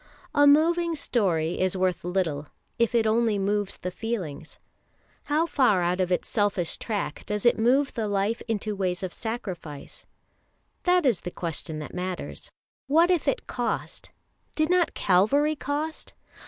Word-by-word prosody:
"A 290 Hz, -1 st, +5 dB
moving 335 Hz, +3 st, +4 dB
story" 180 Hz, -, 0 dB
is 185 Hz, 0 st, +1 dB
worth 185 Hz, -1 st, 0 dB
little 170 Hz, -5 st, -1 dB, 0.3 s
if 235 Hz, +1 st, +2 dB
it 230 Hz, -1 st, +3 dB
only 220 Hz, -1 st, +2 dB
moves 200 Hz, 0 st, -1 dB
the 180 Hz, -, -5 dB
feelings. 180 Hz, -9 st, -5 dB, 0.7 s
How 305 Hz, +3 st, +2 dB
far 245 Hz, -, +3 dB
out 180 Hz, +2 st, +1 dB
of 185 Hz, 0 st, -1 dB
its 180 Hz, -, 0 dB
selfish 200 Hz, -5 st, 0 dB
track 215 Hz, -3 st, -3 dB
does 210 Hz, +1 st, -2 dB
it 240 Hz, -, +4 dB
move 265 Hz, +5 st, +3 dB
the 225 Hz, -3 st, -2 dB
life 205 Hz, +3 st, 0 dB
into 215 Hz, -2 st, -2 dB
ways 185 Hz, -2 st, -2 dB
of 185 Hz, -, -4 dB
sacrifice? 190 Hz, -, -6 dB, 0.8 s
That 360 Hz, -2 st, +4 dB
is 235 Hz, -9 st, +2 dB
the -, -, -4 dB
question 165 Hz, -2 st, -4 dB
that 150 Hz, -, -7 dB
matters. 180 Hz, 0 st, -5 dB, 0.4 s
What 330 Hz, +6 st, +4 dB
if 350 Hz, -4 st, +1 dB
it -, -, 0 dB
cost? -, -, -3 dB, 0.5 s
Did 310 Hz, +2 st, +1 dB
not 360 Hz, -2 st, +2 dB
Calvary 250 Hz, +12 st, +3 dB
cost? 295 Hz, +3 st, -4 dB
210 Hz, 155 wpm, -26 LUFS, 180-285 Hz, 0.8 s, A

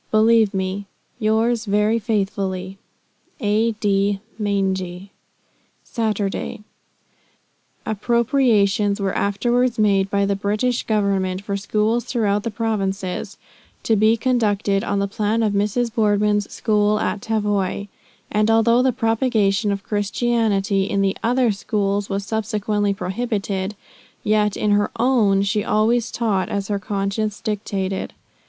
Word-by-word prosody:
Believe 220 Hz, -1 st, +4 dB
me, 190 Hz, +1 st, -3 dB, 0.3 s
"Yours 225 Hz, +1 st, +1 dB
very 210 Hz, +2 st, +2 dB
faithfully, 195 Hz, -3 st, -2 dB, 0.6 s
"A.D. 205 Hz, -3 st, +1 dB, 0.2 s
Maingy 190 Hz, -2 st, -2 dB, 0.7 s
"Saturday." 210 Hz, -4 st, -2 dB, 1.2 s
Appropriations 220 Hz, -3 st, +2 dB
were 195 Hz, -1 st, -1 dB
afterward 240 Hz, +5 st, +1 dB
made 200 Hz, -2 st, +2 dB
by 200 Hz, 0 st, +1 dB
the 200 Hz, 0 st, 0 dB
British 210 Hz, +5 st, 0 dB
government 195 Hz, -3 st, 0 dB
for 200 Hz, -1 st, -3 dB
schools 215 Hz, +4 st, 0 dB
throughout 210 Hz, -5 st, 0 dB
the 230 Hz, -, -3 dB
Provinces 200 Hz, -4 st, -3 dB, 0.5 s
"to 225 Hz, -, +2 dB
be 215 Hz, +2 st, +4 dB
conducted 210 Hz, -5 st, +1 dB
on 200 Hz, -, -1 dB
the 200 Hz, 0 st, 0 dB
plan 215 Hz, +3 st, 0 dB
of 210 Hz, -2 st, +1 dB
Mrs. 210 Hz, +4 st, 0 dB
Boardman's 210 Hz, -2 st, +1 dB
schools 210 Hz, -1 st, +1 dB
at 205 Hz, -, -2 dB
Tavoy;" 205 Hz, -3 st, -1 dB, 0.4 s
and 215 Hz, +1 st, +2 dB
although 230 Hz, +2 st, +4 dB
the 260 Hz, 0 st, +3 dB
propagation 225 Hz, -3 st, +1 dB
of 200 Hz, 0 st, -3 dB
Christianity 205 Hz, -2 st, 0 dB
in 200 Hz, 0 st, 0 dB
the 195 Hz, 0 st, +1 dB
other 245 Hz, 0 st, +2 dB
schools 200 Hz, 0 st, -1 dB
was 200 Hz, 0 st, -2 dB
subsequently 210 Hz, -2 st, -1 dB
prohibited, 195 Hz, 0 st, -3 dB, 0.5 s
yet 210 Hz, -1 st, +1 dB
in 210 Hz, -, +1 dB
her 205 Hz, 0 st, +2 dB
own, 220 Hz, -6 st, +3 dB
she 205 Hz, +1 st, 0 dB
always 225 Hz, +2 st, +1 dB
taught 210 Hz, -5 st, -1 dB
as 200 Hz, 0 st, -3 dB
her 205 Hz, -1 st, 0 dB
conscience 205 Hz, +1 st, -2 dB
dictated. 195 Hz, -3 st, -3 dB
210 Hz, 120 wpm, -21 LUFS, 200-225 Hz, 1.2 s, Believe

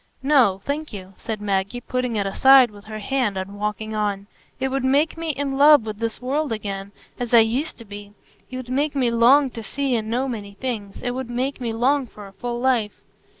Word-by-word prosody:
"No, 255 Hz, -9 st, +4 dB
thank 300 Hz, +2 st, -3 dB
you," 195 Hz, -2 st, -9 dB
said 220 Hz, -2 st, -5 dB
Maggie, 200 Hz, +3 st, -1 dB
putting 250 Hz, -1 st, -2 dB
it 200 Hz, -2 st, 0 dB
aside 260 Hz, +4 st, +6 dB
with 205 Hz, 0 st, -15 dB
her 215 Hz, 0 st, -7 dB
hand 215 Hz, -2 st, -1 dB
and 195 Hz, +2 st, -6 dB
walking 210 Hz, +1 st, -3 dB
on. 205 Hz, -2 st, -2 dB, 0.3 s
"It 265 Hz, 0 st, 0 dB
would 270 Hz, 0 st, -2 dB
make 280 Hz, +4 st, +2 dB
me 330 Hz, 0 st, -4 dB
in 275 Hz, -2 st, -2 dB
love 290 Hz, -4 st, +7 dB
with 215 Hz, -1 st, -6 dB
this 230 Hz, -1 st, -3 dB
world 280 Hz, +3 st, -1 dB
again, 200 Hz, -2 st, -4 dB, 0.3 s
as 245 Hz, -1 st, +1 dB
I 230 Hz, -, +9 dB
used 245 Hz, +8 st, -1 dB
to 230 Hz, -, -12 dB
be; 205 Hz, 0 st, -10 dB, 0.4 s
it 255 Hz, -, -6 dB
would 255 Hz, -1 st, -7 dB
make 285 Hz, +3 st, 0 dB
me 250 Hz, -4 st, +2 dB
long 255 Hz, +4 st, +5 dB
to 230 Hz, -, -7 dB
see 270 Hz, +3 st, -1 dB
and 220 Hz, -1 st, -2 dB
know 250 Hz, +4 st, 0 dB
many 205 Hz, -5 st, -6 dB
things; 215 Hz, -5 st, -5 dB
it 245 Hz, -, -1 dB
would 255 Hz, -1 st, -5 dB
make 255 Hz, +3 st, -2 dB
me 235 Hz, -2 st, -2 dB
long 255 Hz, +4 st, +1 dB
for 210 Hz, -2 st, -12 dB
a 195 Hz, -, -13 dB
full 240 Hz, +3 st, -4 dB
life." 240 Hz, -5 st, 0 dB
240 Hz, 220 wpm, -22 LUFS, 210-265 Hz, 0.4 s, I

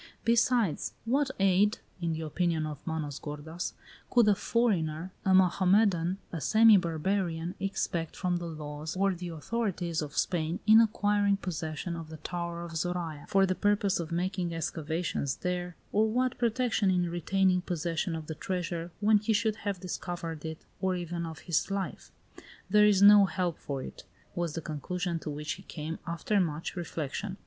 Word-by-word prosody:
"Besides, 235 Hz, -5 st, +2 dB
what 275 Hz, +4 st, +2 dB
aid" 195 Hz, +2 st, +4 dB, 0.2 s
(in 165 Hz, -1 st, 0 dB
the 160 Hz, -, -4 dB
opinion 160 Hz, 0 st, 0 dB
of 150 Hz, -2 st, -5 dB
Manos 155 Hz, -3 st, -3 dB
gordas) 155 Hz, +3 st, -5 dB, 0.4 s
"could 240 Hz, -3 st, +5 dB
a -, -, +6 dB
foreigner, 185 Hz, -6 st, 0 dB
a 190 Hz, -, +2 dB
Mohammedan, 185 Hz, -1 st, +3 dB
a 165 Hz, -, -4 dB
semi 220 Hz, +3 st, +7 dB
barbarian, 170 Hz, 0 st, 0 dB
expect 180 Hz, -4 st, -2 dB
from 180 Hz, -2 st, 0 dB
the 175 Hz, -1 st, -5 dB
laws 150 Hz, 0 st, -6 dB
or 195 Hz, 0 st, +3 dB
the 180 Hz, 0 st, -6 dB
authorities 175 Hz, -1 st, -2 dB
of 145 Hz, -1 st, -6 dB
Spain, 165 Hz, -1 st, 0 dB
in 220 Hz, +1 st, +8 dB
acquiring 205 Hz, -2 st, +2 dB
possession 170 Hz, -2 st, -4 dB
of 165 Hz, -2 st, -7 dB
the 160 Hz, -, -8 dB
Tower 170 Hz, +1 st, -4 dB
of 170 Hz, -, -7 dB
Zoraya 170 Hz, -3 st, -3 dB
for 195 Hz, 0 st, +4 dB
the 185 Hz, -, +1 dB
purpose 205 Hz, -1 st, +1 dB
of 170 Hz, -1 st, -4 dB
making 175 Hz, 0 st, -1 dB
excavations 160 Hz, -3 st, -2 dB
there, 180 Hz, -1 st, -3 dB, 0.2 s
or 215 Hz, +2 st, +3 dB
what 255 Hz, +3 st, 0 dB
protection 235 Hz, -3 st, +1 dB
in 180 Hz, -1 st, +2 dB
retaining 180 Hz, +2 st, +2 dB
possession 170 Hz, -1 st, -2 dB
of 160 Hz, -1 st, -6 dB
the 160 Hz, -, -5 dB
treasure 170 Hz, 0 st, -3 dB
when 210 Hz, 0 st, +5 dB
he 215 Hz, +2 st, 0 dB
should 220 Hz, 0 st, +1 dB
have 200 Hz, -3 st, -3 dB
discovered 175 Hz, -3 st, -5 dB
it, 160 Hz, 0 st, -6 dB
or 190 Hz, -1 st, +1 dB
even 170 Hz, -1 st, -3 dB
of 160 Hz, -2 st, -8 dB
his 170 Hz, +1 st, 0 dB
life? 195 Hz, -1 st, -4 dB, 0.6 s
There 210 Hz, 0 st, +7 dB
is 200 Hz, -1 st, +4 dB
no 205 Hz, 0 st, +9 dB
help 180 Hz, -2 st, -2 dB
for 135 Hz, -2 st, -4 dB
it," -, -, -9 dB, 0.3 s
was 170 Hz, -3 st, -2 dB
the 165 Hz, -, -3 dB
conclusion 170 Hz, +3 st, -3 dB
to 155 Hz, -, -6 dB
which 150 Hz, +1 st, -4 dB
he 190 Hz, -, -5 dB
came, 160 Hz, -3 st, -6 dB
after 170 Hz, +5 st, 0 dB
much 165 Hz, -2 st, -2 dB
reflection. 175 Hz, +3 st, -4 dB
175 Hz, 170 wpm, -30 LUFS, 160-200 Hz, 0.6 s, no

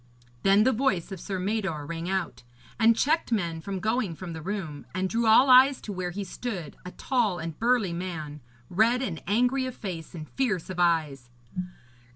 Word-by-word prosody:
Then 195 Hz, +2 st, +5 dB
the 260 Hz, -, +4 dB
voice 215 Hz, -8 st, 0 dB
of 190 Hz, -, -6 dB
Sir 195 Hz, +1 st, -4 dB
Mador 190 Hz, -6 st, -2 dB
rang 165 Hz, +3 st, -4 dB
out, 190 Hz, -2 st, -2 dB, 0.4 s
and 225 Hz, 0 st, +5 dB
checked 310 Hz, +1 st, +1 dB
men 170 Hz, -7 st, -1 dB
from 195 Hz, +2 st, -4 dB
going 215 Hz, -3 st, -1 dB
from 175 Hz, 0 st, -7 dB
the 160 Hz, -, -7 dB
room, 165 Hz, -6 st, -5 dB
and 185 Hz, 0 st, 0 dB
drew 230 Hz, +3 st, 0 dB
all 225 Hz, +5 st, +7 dB
eyes 260 Hz, +1 st, +7 dB
to 210 Hz, -, -6 dB
where 180 Hz, -1 st, -3 dB
he 200 Hz, +3 st, -4 dB
stood, 195 Hz, -4 st, -6 dB
a 180 Hz, -, -7 dB
tall 220 Hz, -2 st, 0 dB
and 165 Hz, -1 st, -6 dB
burly 230 Hz, -6 st, +2 dB
man, 160 Hz, -4 st, -5 dB, 0.3 s
red 230 Hz, -, +2 dB
and 170 Hz, -10 st, -4 dB
angry 250 Hz, +6 st, +2 dB
of 255 Hz, -, -6 dB
face, 175 Hz, -5 st, -6 dB
and 155 Hz, -2 st, -7 dB
fierce 210 Hz, -10 st, -1 dB
of 180 Hz, -, -6 dB
eyes. 155 Hz, -8 st, +1 dB
190 Hz, 190 wpm, -27 LUFS, 170-230 Hz, 0.4 s, all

